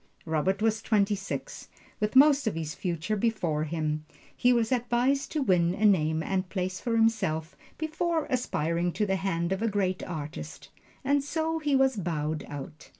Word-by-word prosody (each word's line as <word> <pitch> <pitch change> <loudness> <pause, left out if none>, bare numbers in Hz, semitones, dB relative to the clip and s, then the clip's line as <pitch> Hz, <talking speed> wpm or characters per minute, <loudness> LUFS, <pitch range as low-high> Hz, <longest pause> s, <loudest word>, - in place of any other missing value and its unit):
Robert 180 +6 0
was 220 0 +2
twenty 210 -2 +2
six, 200 0 -5 0.3
with 210 +3 -1
most 280 -1 +6
of 215 - 0
his 160 -1 -3
future 180 +3 -2
before 180 -9 0
him 155 -1 -2 0.3
he 245 - +3
was 235 -1 +2
advised 250 +3 +1
to 305 -3 +1
win 180 -5 +2
a 215 - +1
name 160 -5 +3
and 185 0 -1
place 185 0 -3
for 235 -2 -1
himself 190 -8 +1 0.2
before 320 +1 -1
aspiring 175 -8 0
to 210 - 0
the 190 -1 0
hand 170 -2 -1
of 190 +1 -1
a 230 - +1
great 190 -3 0
artist: 155 -3 -7 0.3
and 280 +1 +2
so 320 +2 -1
he 295 -3 +1
was 265 -3 +3
bowed 155 -4 -2
out. 145 +2 -8
195 Hz, 170 wpm, -28 LUFS, 165-245 Hz, 0.3 s, most